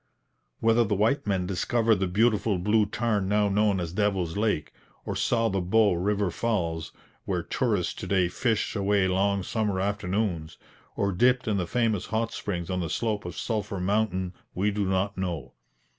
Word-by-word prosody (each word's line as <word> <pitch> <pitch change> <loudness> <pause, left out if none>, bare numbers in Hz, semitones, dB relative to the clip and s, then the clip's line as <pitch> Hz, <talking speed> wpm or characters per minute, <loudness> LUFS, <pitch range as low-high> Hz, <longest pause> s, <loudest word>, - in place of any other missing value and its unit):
Whether 115 +1 +4
the 105 -2 0
white 115 +6 +1
men 95 -3 0
discovered 110 +4 +1
the 95 0 0
beautiful 105 +1 +2
blue 105 +3 +2
tarn 105 -3 -1
now 105 0 +3
known 100 -1 +2
as 85 -1 -4
Devil's 95 -5 0
Lake, 105 -7 0 0.3
or - - -3
saw 115 -1 +1
the 95 -3 0
Bow 105 +3 +3
river 100 +2 0
falls, 85 -9 -2 0.3
where - - -1
tourists - - 0
to - - -7
day 95 -3 +2
fish 110 +5 -1
away 100 -1 +2
long 100 +1 +1
summer 105 -2 -1
afternoons, 95 -4 -2 0.4
or 100 0 0
dipped 125 +7 +2
in 105 -2 +1
the 90 -3 -1
famous 115 -4 0
hot 115 +1 -1
springs 85 -3 -4
on 90 - -1
the 85 -2 -2
slope 110 -2 -1
of 90 - -6
Sulphur 105 -4 -2
mountain, 95 -1 0 0.2
we 100 +3 +1
do 100 0 -1
not 95 +1 0
know. 85 -6 -4
100 Hz, 175 wpm, -27 LUFS, 95-110 Hz, 0.4 s, Whether